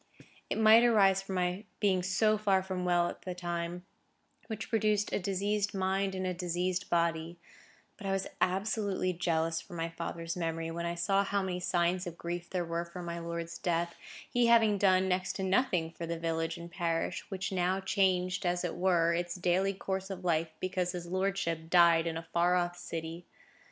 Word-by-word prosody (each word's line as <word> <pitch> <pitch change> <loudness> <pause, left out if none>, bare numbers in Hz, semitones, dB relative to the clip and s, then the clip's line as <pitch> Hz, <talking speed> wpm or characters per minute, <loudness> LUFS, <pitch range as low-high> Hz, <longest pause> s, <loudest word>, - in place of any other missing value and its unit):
It - - -1
might 220 +1 +7
arise 195 -5 +5
from 195 0 -5
my 180 +2 0 0.2
being 190 -3 +2
so 205 +4 +2
far 200 -3 +2
from 185 -1 -3
well 175 -1 +3
at - - -7
the 180 -1 -5
time, 175 0 -4 0.6
which 220 -1 -5
produced 215 -2 +1
a - - +1
diseased 200 +2 -1
mind 190 0 0
in 185 0 -2
a 185 - 0
diseased 180 +1 -2
body; 170 0 0 0.6
but 205 - -6
I - - 0
was 195 0 0 0.2
absolutely 195 0 0
jealous 165 -1 0
for 175 - -11
my 165 0 -2
father's 165 0 -5
memory, 165 -1 -2
when 170 +1 -3
I 170 - -2
saw 195 +3 +2
how 200 0 0
many 180 -1 -2
signs 180 +1 0
of 170 -1 -7
grief 175 0 -5
there 180 -2 -1
were 170 0 -2
for 175 +1 -8
my 170 0 -4
lord's 170 0 -5
death, 170 -1 -1 0.3
he 245 -1 +2
having 225 -3 +5
done 190 -1 +4
next 185 0 0
to 190 - -4
nothing 185 -4 +1
for 165 0 -6
the 170 0 -2
village 165 0 -2
and 170 0 -9
parish, 165 -2 -1
which 195 0 -3
now 185 0 +1
changed, 190 -1 +1
as 175 0 0
it 175 - -2
were, 175 -2 +3
its 175 0 -2
daily 185 +2 +1
course 190 0 -3
of 185 -2 -6
life, 165 -1 +1
because 185 -1 -1
his 175 -1 -5
lordship 185 -3 -1
died 170 -1 +5
in 165 -1 -2
a 165 0 -7
far 175 +1 +3
off 175 -1 0
city. 165 0 -6
180 Hz, 190 wpm, -31 LUFS, 170-195 Hz, 0.6 s, might